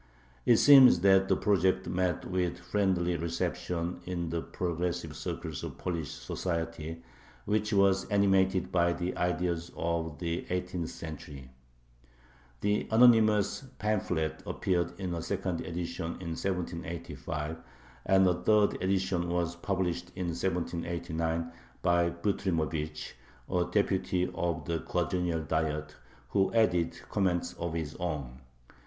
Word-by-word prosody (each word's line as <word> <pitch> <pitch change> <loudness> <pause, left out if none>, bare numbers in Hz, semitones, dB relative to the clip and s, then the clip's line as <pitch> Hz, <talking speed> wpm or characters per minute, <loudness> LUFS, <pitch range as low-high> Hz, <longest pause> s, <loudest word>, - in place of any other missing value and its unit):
It 120 - +7
seems 130 -11 +8
that 95 0 +5
the - - +3
project 95 -2 +2
met 90 -1 -1
with 90 -2 -1
a - - -17
friendly 90 -4 +1
reception 85 +1 -2
in 85 -2 -3
the 85 -1 -1
progressive 85 -2 -3
circles - - -5
of - - -6
Polish 85 -5 -3
society, 80 -2 -4 0.4
which 105 +1 0
were 100 -2 +5 0.2
animated 95 -2 +3
by 85 -1 +3
the 85 +1 -3
ideas 85 -1 -1
of 85 -2 -2
the 85 -1 -3
eighteenth 90 -2 -2
century. 70 -5 -8 1.1
The 105 0 +1
anonymous 110 -2 +5
pamphlet 90 -7 -1
appeared 85 -1 -1
in 90 -2 -3
a 85 - -3
second 95 -2 -2
edition 85 -1 -4
in 90 -2 -5
1785, 85 -4 -4 0.5
and 95 0 +5
a 90 - +4
third 105 +1 +3
edition 95 -2 0
was 85 -1 0
published 90 -1 -2
in 90 -2 -2
1789 85 -1 -2 0.3
by 85 0 +3
Butrymovich, 80 -4 -2 0.3
a 90 -1 0
deputy 95 -2 +1
of 85 -3 -2
the 85 0 -1
Quadrennial 85 -2 -1
Diet, 75 -1 -1 0.3
who 95 +5 +2
added 85 -6 +2
comments 95 -4 0
of 85 -1 -4
his 80 -2 -3
own. 70 -8 -4
85 Hz, 125 wpm, -30 LUFS, 85-95 Hz, 1.1 s, seems